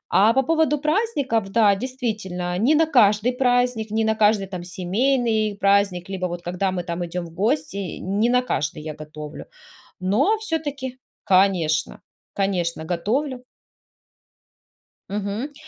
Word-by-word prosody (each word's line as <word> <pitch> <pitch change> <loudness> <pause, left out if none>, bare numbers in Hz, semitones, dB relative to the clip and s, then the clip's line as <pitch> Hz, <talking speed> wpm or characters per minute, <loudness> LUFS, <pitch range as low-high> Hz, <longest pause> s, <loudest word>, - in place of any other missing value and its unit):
А 215 +3 +6
по 265 +1 +3
поводу 315 0 +2
праздников- 290 - 0
да, 210 -2 +4
действительно, 210 -7 -3
не 270 +8 +4
на 320 +1 +4
каждый 230 -4 +4
праздник, 245 -3 +1
не 220 0 +1
на 220 - +2
каждый 210 -2 +3
там 180 -2 -6
семейный 215 +3 0
праздник 195 -3 +2
либо 185 -1 -3
вот 175 0 -6
когда 180 +2 -1
мы 180 -2 -3
там 175 0 -3
идем 175 +1 -4
в 165 - -12
гости, 205 - -1
не 205 +5 0
на 250 0 +3
каждый 150 -9 -2
я 155 -1 -5
готовлю, 150 0 -9 0.5
но 250 - +2
все-таки, 290 - -4 0.3
конечно 185 -5 +2 0.3
конечно 175 -5 -1
готовлю. 245 - -2 1.7
Мгм. 210 +8 -3
210 Hz, 135 wpm, -23 LUFS, 180-255 Hz, 1.7 s, А